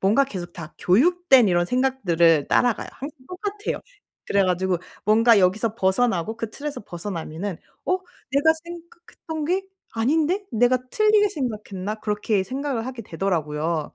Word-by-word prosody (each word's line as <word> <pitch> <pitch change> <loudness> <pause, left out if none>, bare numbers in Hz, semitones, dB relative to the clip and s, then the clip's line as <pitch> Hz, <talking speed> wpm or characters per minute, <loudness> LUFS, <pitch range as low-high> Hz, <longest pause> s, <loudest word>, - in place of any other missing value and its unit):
뭔가 220 +9 +4
계속 175 -8 -7
다 170 -2 -9
교육된 265 - +4
이런 175 -1 +2
생각들을 175 - +2
따라가요. 245 -4 +2
항상 290 +4 -8
똑같아요. 410 +3 -4 0.5
그래 200 -1 +3
가지고 180 -1 +1 0.3
뭔가 225 +1 +5
여기서 210 +4 +2
벗어나고 205 -1 +1
그 230 -1 -4
틀에서 290 +4 -5
벗어나면은 175 0 -5 0.3
'어 - - +2 0.4
내가 285 +4 +4
생각했던 340 -2 -8
게 370 +4 +1 0.3
아닌데 315 - +1
내가 245 +3 +3
틀리게 425 -1 +4
생각했나?' 215 - -4
그렇게 210 -1 0
생각을 260 0 -3
하게 255 -3 -6
되더라고요. 160 -4 -2
225 Hz, 345 characters per minute, -23 LUFS, 185-285 Hz, 0.5 s, 뭔가